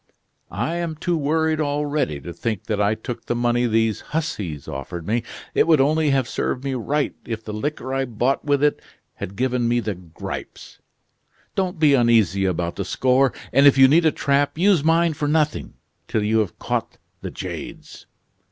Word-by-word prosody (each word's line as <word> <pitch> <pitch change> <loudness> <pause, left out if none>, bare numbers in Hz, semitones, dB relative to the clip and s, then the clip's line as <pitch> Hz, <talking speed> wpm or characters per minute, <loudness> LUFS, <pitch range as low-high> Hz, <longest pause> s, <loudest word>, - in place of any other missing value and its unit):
I 170 - -2
am 170 -2 -3
too 175 +3 -1
worried 160 +1 +1
already 145 - -1
to 85 - -7
think 110 +2 -3
that 105 -2 -1
I 105 +1 +2
took 115 +1 -7
the 120 - 0
money 120 0 +1
these 110 -1 +1
hussies 100 - -4
offered 80 +5 -6
me. 115 +5 0 0.3
It - - +3
would 160 -3 +5
only 155 +3 +3
have 135 -3 +2
served 125 - -2
me 135 -1 -2
right 140 +4 -1
if 115 -1 -5
the 105 - -5
liquor 130 +3 -3
I 135 0 0
bought 125 +3 0
with 145 -1 +1
it 150 - +2 0.3
had 95 - -7
given 125 +1 0
me 120 +1 +2
the 110 -3 -2
gripes. 90 -3 -9 0.7
Don't 185 -2 -1
be 155 -3 +4
uneasy 115 -7 +3
about 85 -2 -1
the 100 - -1
score, 130 +6 +2 0.2
and 140 +1 +6
if 140 - +6
you 135 0 +8
need 160 +4 +4
a - - +4
trap 140 +1 0
use 180 -3 +3
mine 165 +1 +3
for 145 0 -2
nothing, 150 0 0 0.3
till 110 - 0
you 110 +2 +2
have 105 -5 -2
caught - - -3 0.2
the - - -5
jades." - - -8
130 Hz, 185 wpm, -22 LUFS, 110-150 Hz, 0.7 s, you